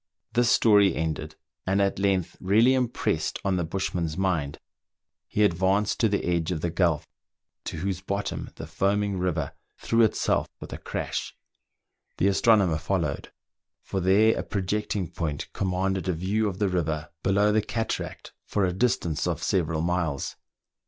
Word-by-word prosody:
This 120 0 +3
story 100 -6 +5
ended, 80 -1 -3 0.3
and 95 +1 +2
at 100 -1 +1
length 95 -3 +1
really 110 +7 +4
impressed 125 -2 0
on 95 -1 +2
the 90 - 0
bushman's 85 -2 -2
mind, 85 -7 0 0.7
he 105 - +1
advanced 95 +2 +2
to 110 - +3
the 100 - 0
edge 85 -1 0
of 80 -4 -2
the 85 - -1
gulf 85 -4 +1 0.6
to - - -4
whose 95 +2 -2
bottom 100 +1 -3
the - - -7
foaming 100 0 0
river 90 -3 -1 0.3
threw 115 0 +1
itself 110 - +2
with - - -8
a - - -6
crash: - - -4 0.8
the 95 - +3
astronomer 100 -5 +4
followed, 85 -5 -2 0.5
for 95 - -3
there 100 +5 +4
a - - 0
projecting 100 -1 -2
point 75 -3 -4
com 95 - -1
manded 95 +1 -1
a 90 - +2
view 100 +6 0
of 95 - -6
the 105 - +1
river, 80 -4 -2
below 100 +2 +3
the 110 +1 +3
cataract, 115 +1 -4
for 100 -2 +1
a 90 - 0
distance 90 -7 0
of - - -2
several 80 -4 0
miles. 85 -5 -1
95 Hz, 160 wpm, -26 LUFS, 85-100 Hz, 0.8 s, story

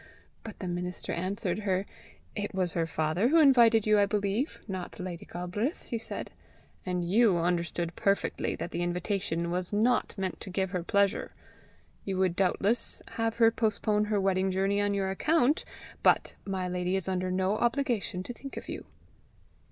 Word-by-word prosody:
But 225 - -8
the 185 - -5
minister 180 0 -3
answered 185 +1 -1
her. 195 -2 0 0.5
"It 205 -2 -3
was 185 -3 0
her 165 -1 0
father 160 +7 +1
who 315 +6 +4
invited 235 -7 +6
you, 215 -1 +4
I 200 - +4
believe, 205 +6 -1
not 185 -3 -6
Lady 180 -2 -6
Galbraith," 185 - -3
he 230 - -4
said; - - -5 0.5
"and 180 -2 -2
you 205 0 +4
understood 170 0 -1
perfectly 200 0 0
that 175 - -5
the - - -2
invitation 175 -1 -1
was 180 0 -2
not 220 +4 +1
meant 190 -2 -3
to - - -6
give 190 0 -1
her 180 -3 -1
pleasure. 200 +3 +1 0.7
You 195 -2 -2
would 185 -2 +2
doubtless 195 +4 0
have 225 0 -1
her 230 -1 +5
postpone 210 -1 +1
her 210 -1 +1
wedding 190 0 +2
journey 195 +2 +1
on 205 0 +1
your 190 -1 0
account, 295 +6 +2 0.4
but - - +3
my 190 -2 -2
lady 180 +1 -1
is 190 -2 -1
under 185 -1 -1
no 190 +3 +1
obligation 240 -7 0
to 245 - -6
think 275 +3 -9
of - - -7
you." - - -6
195 Hz, 170 wpm, -29 LUFS, 180-215 Hz, 0.7 s, invited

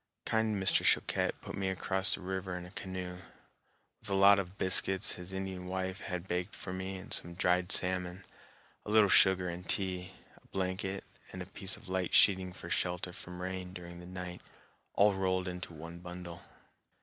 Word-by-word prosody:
Kind 110 -1 +1
Mr. 95 -1 +3
Choquette - - +2
put - - -7
me 95 -1 -1
across 95 0 +1
the - - -11
river 95 -1 -3
in 90 - -7
a 90 - -11
canoe, 90 -2 -5 0.8
with 110 - -6
a 100 - +1
lot 100 +1 +7
of 95 0 -5
biscuits 95 0 +4
his 90 +1 -7
Indian 95 -1 -4
wife 95 +1 -3
had 90 -2 -5
baked 90 0 -2
for 90 - -6
me 95 +1 -4
and 95 - -6
some 85 0 +1
dried 90 0 +2
salmon, 90 0 +2 0.6
a - - -8
little 105 -1 +5
sugar 95 0 +6
and 90 +1 -6
tea, 95 -1 -2 0.3
a - - -24
blanket, 95 +1 -2 0.3
and 90 0 -5
a - - -11
piece 95 +1 -2
of - - -16
light 95 -1 0
sheeting 95 -2 +5
for 90 -1 -9
shelter 90 0 -1
from 90 0 -7
rain 95 0 -4
during 85 -1 -9
the 90 - -10
night, 90 -1 -7 0.5
all 100 0 +5
rolled 95 -1 0
into 90 -1 -5
one 85 +2 -9
bundle. 90 -1 -8
95 Hz, 185 wpm, -32 LUFS, 90-95 Hz, 0.8 s, lot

